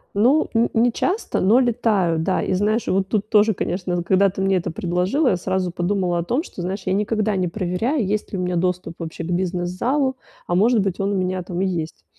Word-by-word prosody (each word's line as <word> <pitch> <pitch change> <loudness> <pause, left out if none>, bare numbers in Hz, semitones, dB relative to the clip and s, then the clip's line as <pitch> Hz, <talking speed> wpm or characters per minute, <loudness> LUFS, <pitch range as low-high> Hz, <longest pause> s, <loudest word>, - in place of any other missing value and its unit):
Ну, 250 +9 +3
ни 230 0 +2
не 240 +1 +3
часто, 380 - -1
но 215 +7 +4
летаю, 220 -9 +1
да. 185 +4 0
И - - -1
знаешь, 210 +4 0
вот 190 0 +1
тут 210 +1 -1
тоже, 215 0 +4
конечно, 180 -1 -2
когда 190 +3 +3
ты 190 +1 -5
мне 195 0 +2
это 175 - -2
предложила, 180 - 0
я 180 - +1
сразу 185 0 -1
подумала 180 0 0
о - - -1
том, 250 - -1
что, 195 - -9
знаешь, 190 +3 -4
я 185 - 0
никогда 210 +1 0
не 185 - 0
проверяю, 210 - -1
есть 210 +2 -2
ли 195 - -1
у - - -2
меня 180 -1 -1
доступ 180 -1 -1
вообще 165 0 -6
к - - -5
бизнес-залу, 185 +10 -1 0.3
а, 175 - 0
может 220 +4 +4
быть, 195 -1 -2
он 195 +1 0
у - - 0
меня 185 0 -1
там 180 0 -4
и - - +2
есть. 165 - -4
190 Hz, 225 wpm, -21 LUFS, 180-215 Hz, 0.3 s, но